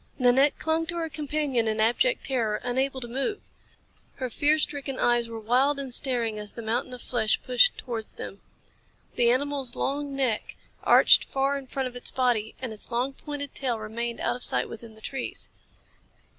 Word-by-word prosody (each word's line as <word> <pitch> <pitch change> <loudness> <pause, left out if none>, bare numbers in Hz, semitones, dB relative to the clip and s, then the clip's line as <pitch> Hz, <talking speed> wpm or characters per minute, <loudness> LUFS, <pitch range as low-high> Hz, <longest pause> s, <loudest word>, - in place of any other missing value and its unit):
Nanette 265 +3 +4
clung 320 +1 0
to 345 - -2
her 330 -1 -2
companion 290 -6 0
in 215 0 0
abject 240 - +2
terror, 230 -6 0
unable 260 +2 0
to 240 - -5
move. 270 - -2 0.8
Her 255 -2 -4
fear 295 +6 +3
stricken 285 -3 -1
eyes 240 -1 +2
were 225 -1 -6
wild 260 +6 +2
and 270 -3 -4
staring 235 -5 +1
as 210 0 -7
the 235 - -7
mountain 235 +3 -1
of 245 - -12
flesh 220 -3 +1
pushed 255 +10 +4
towards 230 -3 -5
them. 195 - -8 0.7
The 235 -1 +3
animal's 270 0 0
long 280 0 -2
neck 255 -5 -1 0.3
arched - - +6
far 275 0 0
in 275 -1 -6
front 265 0 -2
of 250 - -10
its 245 - -1
body, 240 -4 0
and 255 -4 -4
its 215 - -7
long, 250 +3 0
pointed 285 -1 -6
tail 250 -4 -1
remained 230 +2 -4
out - - 0
of 250 - -6
sight - - +2
within 225 -1 -10
the 220 - -17
trees. 265 +2 -4
255 Hz, 185 wpm, -27 LUFS, 235-280 Hz, 0.8 s, arched